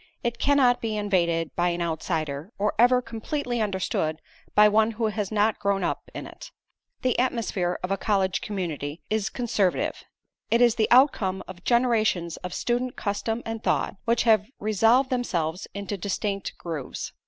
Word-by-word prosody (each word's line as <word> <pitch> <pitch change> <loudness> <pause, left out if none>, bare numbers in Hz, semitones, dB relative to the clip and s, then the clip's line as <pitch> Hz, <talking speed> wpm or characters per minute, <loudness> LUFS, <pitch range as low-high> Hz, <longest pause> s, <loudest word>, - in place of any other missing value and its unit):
It 235 -1 -2
cannot 265 -4 +3
be 220 -2 -2
invaded 170 -6 0
by 175 +1 +2
an 175 0 -2
outsider, 160 0 -3
or 210 +1 0
ever 250 +1 +5
completely 240 +1 -3
understood 190 -6 -1 0.4
by 210 0 +8
one 220 +2 +3
who 225 +1 -1
has 210 -1 -3
not 215 0 +2
grown 200 -1 0
up - - -3
in - - -5
it. - - -11 0.5
The 255 -2 +1
atmosphere 215 -8 0
of 180 - -2
a 195 - +1
college 195 -3 +1
community 165 -7 -4
is 215 -2 0
conservative. 210 -6 0 0.5
It 235 - +3
is 240 -2 +5
the 220 -2 +1
outcome 225 -8 +4
of 185 -1 -10
generations 220 -8 +2
of 180 - -7
student 245 +1 -1
custom 225 +3 -2
and 225 -1 -4
thought, - - 0
which 235 0 +2
have 215 -3 +4
resolved 225 +6 +3
themselves 180 -9 -1
into 200 0 -4
distinct 200 +1 -3
grooves. 160 -6 -5
210 Hz, 160 wpm, -26 LUFS, 180-235 Hz, 0.5 s, by